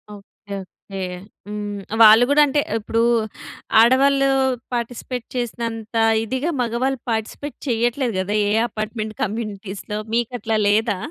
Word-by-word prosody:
Okay. 200 0 -11 0.3
Okay. 195 - -5 0.5
హ్మ్. 205 -1 -5 0.2
వాళ్ళు 220 +2 +9
కూడా 300 - +6
అంటే 290 +1 +1 0.2
ఇప్పుడు 225 +1 -1 0.8
ఆడవాళ్ళు 275 +3 +5 0.4
పార్టిసిపేట్ 245 +1 -4
చేసినంత 230 -2 -4 0.3
ఇదిగా 260 +9 -2
మగవాళ్ళు 245 +3 -1
పార్టిసిపేట్ 225 +6 -4
చెయ్యట్లేదు 240 +1 0
కదా! 190 +2 -2 0.2
ఏ - - +1 0.2
అపార్ట్‌మెంట్ 215 0 -4
కమ్యూనిటీస్‌లో 210 -2 -4 0.2
మీకు 235 +1 +1
అట్లా 225 -1 0
లేదా? 210 0 +2
225 Hz, 115 wpm, -21 LUFS, 210-245 Hz, 0.8 s, వాళ్ళు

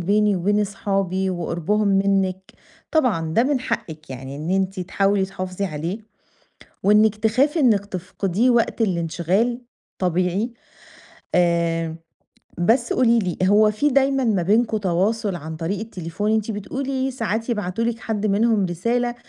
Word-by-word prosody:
بيني 205 +2 +2
وبين 205 +4 +1
أصحابي 195 -2 -1
وقربهم 180 +4 -1
منِك، 195 -1 +1 0.4
طبعًا 195 - +1
ده 230 - +4
من 275 -1 +1
حقِك 160 - -5
يعني 130 +2 -7
إن 155 +4 -4
أنتِ 190 0 0
تحاولي 195 +2 +1
تحافظي 185 0 -4
عليه، 170 +3 -3 0.9
وإنِك 210 +1 +4
تخافي 255 +9 +1
إنِك 215 -7 +3
تفقديه 195 +4 -1
وقت 235 -1 +2
الانشغال 185 +6 0 0.4
طبيعي، 185 +6 0 0.8
آمم 170 -2 +1 0.6
بس 235 +7 +2
قولي 235 -2 +3
لي، 185 -6 -2
هو 210 +3 +5
في 250 +8 +1
دايمًا 270 0 +2
ما 210 -6 +1
بينكم 220 +5 +2
تواصل 200 +2 0
عن 160 0 -7
طريق 175 +5 -3
التليفون؟ 205 0 -3
أنتِ 220 0 0
بتقولي 265 +6 -3
ساعات 225 -2 -3
يبعتوا 210 0 -2
لِك 235 -1 -1
حد 215 -2 -2
منهم 210 0 +2
رسالة، 240 +8 -1
200 Hz, 135 wpm, -22 LUFS, 180-225 Hz, 0.9 s, هو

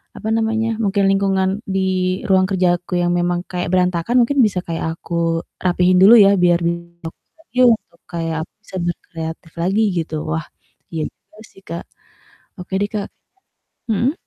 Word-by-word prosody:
apa 220 - -6
namanya, 225 0 0
mungkin 200 0 +1
lingkungan 195 -1 +1 0.2
di 190 -1 0
ruang 190 -1 +4
kerja 185 -2 +2
aku 180 0 -3
yang 175 0 +1
memang 175 0 0
kayak 180 -1 -2
berantakan, 180 +4 +1
mungkin 280 +4 0
bisa 200 -4 0
kayak 165 -1 -3
aku 165 -1 -1 0.2
rapihin 180 0 +3
dulu 200 +5 +8
ya 200 -1 +6
biar 175 -1 +4
besok 170 -1 -4 1.0
kayak 165 -2 -2
aku - - -57
bisa 205 - -12
berkreatif 165 -1 -5
lagi 190 +6 +1
gitu, 165 -2 -2 0.2
Wah, 160 0 -1 0.5
iya 160 -2 -2
juga 210 - -27
sih 195 - -18
Kak. 170 -1 -6 0.8
Oke 180 +1 -9
deh, 205 - 0
Kak. 210 -2 -3 0.8
Mhm? 235 +6 +1
180 Hz, 150 wpm, -19 LUFS, 170-195 Hz, 1.0 s, dulu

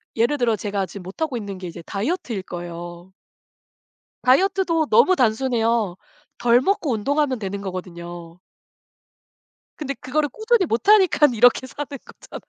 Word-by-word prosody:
예를 235 +6 +2
들어 235 -2 +2
제가 200 -2 -2
지금 195 -1 -10
못하고 255 - -3
있는 200 -4 -6
게 185 - -6
이제 170 0 -9
다이어트일 225 - -3
거예요. 175 0 -8 1.1
다이어트도 335 +3 +2
너무 375 -6 +5
단순해요. 230 -4 +1 0.4
덜 240 +1 +4
먹고 380 - 0
운동하면 265 +4 0
되는 200 -1 -4
거거든요. 175 -2 -8 1.4
근데 280 -2 -4
그거를 290 +4 -1
꾸준히 440 - +1
못 235 - -2
하니깐 370 - +5
이렇게 245 +3 +4
사는 290 +3 -6 0.2
거잖아요. - - -12
235 Hz, 330 characters per minute, -22 LUFS, 190-295 Hz, 1.4 s, 너무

